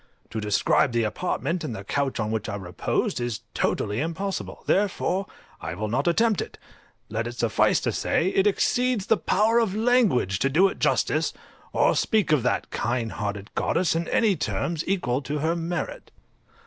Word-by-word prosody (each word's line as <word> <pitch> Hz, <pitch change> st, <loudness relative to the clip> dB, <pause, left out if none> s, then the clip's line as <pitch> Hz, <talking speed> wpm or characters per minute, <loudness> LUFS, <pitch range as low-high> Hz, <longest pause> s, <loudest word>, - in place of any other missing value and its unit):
To 110 Hz, -, -3 dB
describe 105 Hz, +4 st, +2 dB
the 115 Hz, -1 st, +2 dB
apartment, 165 Hz, -, -2 dB
and 125 Hz, -7 st, -4 dB
the 100 Hz, -, -7 dB
couch 140 Hz, +5 st, -1 dB
on 105 Hz, 0 st, -1 dB
which 110 Hz, 0 st, -2 dB
I 100 Hz, -, -3 dB
reposed, 95 Hz, +3 st, -2 dB
is 120 Hz, -1 st, -3 dB
totally 105 Hz, +2 st, 0 dB
impossible, 185 Hz, +5 st, -4 dB
therefore 195 Hz, -1 st, +1 dB, 0.3 s
I 80 Hz, -, -4 dB
will 105 Hz, +3 st, -3 dB
not 130 Hz, +8 st, 0 dB
attempt 220 Hz, +4 st, +3 dB
it; -, -, -7 dB, 0.5 s
let 115 Hz, +2 st, -2 dB
it 120 Hz, -, -6 dB
suffice 115 Hz, -3 st, +2 dB
to -, -, 0 dB
say, 180 Hz, -, +1 dB
it 195 Hz, +1 st, +2 dB
exceeds 245 Hz, +1 st, +1 dB
the 225 Hz, -, +4 dB
power 220 Hz, +5 st, +2 dB
of 215 Hz, -4 st, 0 dB
language 215 Hz, -, +2 dB
to 135 Hz, -, +2 dB
do 175 Hz, +8 st, +5 dB
it -, -, -8 dB
justice, -, -, +1 dB, 0.4 s
or -, -, +3 dB
speak 215 Hz, -8 st, +1 dB
of 150 Hz, -4 st, +4 dB
that 125 Hz, -, -1 dB
kind 120 Hz, -1 st, -1 dB
hearted 100 Hz, 0 st, -4 dB
goddess 170 Hz, -1 st, +1 dB
in 165 Hz, 0 st, -1 dB
any 215 Hz, -4 st, +3 dB
terms 165 Hz, +1 st, -2 dB
equal 145 Hz, -9 st, 0 dB
to 145 Hz, +3 st, -3 dB
her 160 Hz, +3 st, 0 dB
merit. 170 Hz, -2 st, -4 dB
155 Hz, 175 wpm, -25 LUFS, -, 0.5 s, do